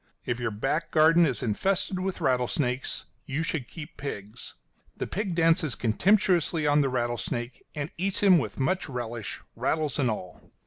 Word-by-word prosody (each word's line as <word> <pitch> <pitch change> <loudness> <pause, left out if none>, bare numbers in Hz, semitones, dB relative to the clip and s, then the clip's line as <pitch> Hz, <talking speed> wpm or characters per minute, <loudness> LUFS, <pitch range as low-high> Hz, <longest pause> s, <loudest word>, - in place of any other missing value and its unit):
If 120 0 -1
your 120 -1 0
back 130 +10 -1
garden 165 +2 +5
is 130 - -2
infested 185 - 0
with 190 0 -3
rattlesnakes 125 +1 0 0.2
you 140 +4 -1
should 155 -6 -2
keep 155 +2 -10
pigs. 105 -6 -6 0.4
The - - -2
pig 195 -3 -2
dances 165 -6 +3
contemptuously 175 - +2
on 145 0 +4
the 135 - +1
rattlesnake, 120 0 -2
and 145 0 -3
eats 195 +2 0
him 185 -4 +7
with 110 -6 -4
much 140 +6 0
relish, 120 -4 -5
rattles 155 -4 0
and 130 -4 +3
all. 90 -5 -5
145 Hz, 160 wpm, -27 LUFS, 120-165 Hz, 0.4 s, him